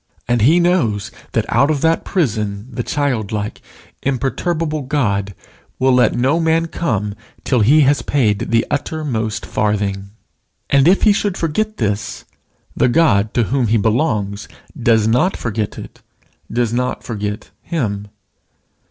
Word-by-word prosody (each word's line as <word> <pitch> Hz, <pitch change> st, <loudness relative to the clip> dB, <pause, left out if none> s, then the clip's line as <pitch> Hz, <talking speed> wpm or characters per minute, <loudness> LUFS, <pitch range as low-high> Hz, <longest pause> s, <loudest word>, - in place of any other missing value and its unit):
And 120 Hz, -1 st, +1 dB
he 155 Hz, +10 st, +5 dB
knows 165 Hz, -, +1 dB, 0.2 s
that -, -, +1 dB
out 140 Hz, -, +3 dB
of 150 Hz, -3 st, 0 dB
that 165 Hz, 0 st, +2 dB
prison 105 Hz, -, -1 dB
the 120 Hz, -, -3 dB
childlike, 110 Hz, -7 st, -2 dB, 0.4 s
imperturbable 155 Hz, +4 st, -1 dB
God 105 Hz, -9 st, -1 dB, 0.4 s
will 130 Hz, 0 st, +3 dB
let 125 Hz, -1 st, +3 dB
no 135 Hz, +7 st, +2 dB
man 165 Hz, 0 st, +2 dB
come 105 Hz, -, -2 dB, 0.3 s
till 125 Hz, -, +1 dB
he 140 Hz, +9 st, +5 dB
has 145 Hz, 0 st, +3 dB
paid 110 Hz, -8 st, 0 dB
the 115 Hz, +1 st, +2 dB
uttermost 140 Hz, -8 st, -2 dB
farthing. 100 Hz, -2 st, -1 dB, 0.6 s
And 140 Hz, +1 st, +5 dB
if 190 Hz, +3 st, +4 dB
he 210 Hz, -, +6 dB
should 200 Hz, -2 st, -1 dB
forget 215 Hz, +7 st, -1 dB
this, 105 Hz, -1 st, -2 dB, 0.5 s
the -, -, +3 dB
God 110 Hz, -9 st, +3 dB
to 120 Hz, -, +3 dB
whom 130 Hz, -4 st, +2 dB
he 115 Hz, +2 st, +3 dB
belongs 105 Hz, -3 st, 0 dB, 0.3 s
does 115 Hz, -5 st, +2 dB
not 125 Hz, +12 st, +2 dB
forget 110 Hz, -2 st, -3 dB
it, -, -, -10 dB, 0.5 s
does 120 Hz, -1 st, 0 dB
not 125 Hz, +1 st, -1 dB
forget 105 Hz, -2 st, -5 dB
him. 105 Hz, -11 st, -3 dB
120 Hz, 140 wpm, -18 LUFS, 105-150 Hz, 0.6 s, he